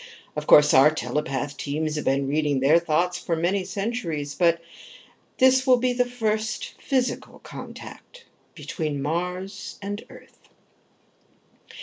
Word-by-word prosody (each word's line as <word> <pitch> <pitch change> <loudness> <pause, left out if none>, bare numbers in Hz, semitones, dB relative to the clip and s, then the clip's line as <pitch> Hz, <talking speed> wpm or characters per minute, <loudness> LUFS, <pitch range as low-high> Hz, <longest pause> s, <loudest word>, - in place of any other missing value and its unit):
Of 150 0 -4
course 150 0 +7
our 135 +3 +7
telepath 145 -2 -3
teams 155 +2 -2
have 150 - -3
been 135 +1 +1
reading 145 -1 +1
their 145 +6 +5
thoughts 170 +2 0
for 165 - -2
many 180 +4 0
centuries, 185 -7 -3
but 170 -1 +2 0.8
this 260 0 +4
will 255 -1 +6
be 250 +1 +1
the 245 0 0
first 220 -2 -2
physical 260 -3 -1
contact - - -11 0.3
between 155 -4 -4
Mars 180 +6 -4
and 205 +1 -5
Earth." - - -16
170 Hz, 125 wpm, -24 LUFS, 150-215 Hz, 0.8 s, course